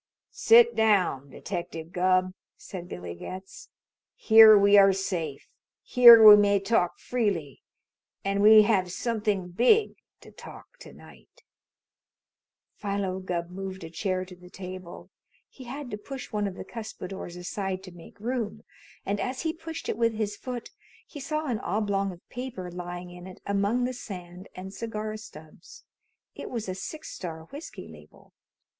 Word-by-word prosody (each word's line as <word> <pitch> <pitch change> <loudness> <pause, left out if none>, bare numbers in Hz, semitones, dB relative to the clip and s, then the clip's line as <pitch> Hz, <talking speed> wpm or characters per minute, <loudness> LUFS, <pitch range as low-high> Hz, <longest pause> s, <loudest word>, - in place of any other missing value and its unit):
"Sit 470 +1 +5
down, 185 -11 +2
Detective 165 +3 -6
Gubb," 185 0 +1 0.2
said 180 -2 -9
Billy 90 -1 -7
Getz. 185 - -10 0.5
"Here 220 -1 +8
we 200 0 +5
are 195 -1 +7
safe. 175 -7 -4 0.4
Here 235 -2 +9
we 210 - +12
may 205 -1 +3
talk 195 -3 0
freely. 200 - -2 0.6
And 200 0 0
we 215 +1 +8
have 190 -4 +1
something 210 -4 -2
big 250 - +3 0.3
to - - -15
talk - - -14
to - - -12
night." - - -18 1.3
Philo 200 -2 -3
Gubb 175 -2 -4
moved 190 0 -7
a 165 - -9
chair 185 +1 -2
to 180 0 -13
the 180 0 -16
table. 185 -1 -10 0.4
He 260 - -14
had 265 +1 -7
to 210 - -5
push 265 +4 -8
one 210 -1 -1
of 190 - -6
the - - -8
cuspidors 195 -6 -8
aside 190 +1 -4
to 185 - -11
make 175 +2 -15
room, 225 -1 -4 0.4
and 200 +1 -2
as 255 +1 -3
he 320 -1 -1
pushed 325 0 -8
it - - -2
with 230 -1 +1
his 210 -1 -2
foot 245 +1 -7 0.3
he 295 - -11
saw 305 +3 -3
an 240 -7 -2
oblong 200 -1 -1
of 175 -1 -15
paper 245 -8 -7
lying 175 0 -7
in 180 +1 -11
it 185 - -12
among 200 +5 0
the 255 +1 -1
sand 180 -6 -9
and 190 +1 -8
cigar 215 -1 -5
stubs. 195 - -13 0.5
It - - -8
was 230 -4 -5
a 185 - -3
Six 305 +12 -8
Star 160 -3 -7
whiskey 290 +4 -9
label. - - -17
200 Hz, 155 wpm, -27 LUFS, 180-230 Hz, 1.3 s, we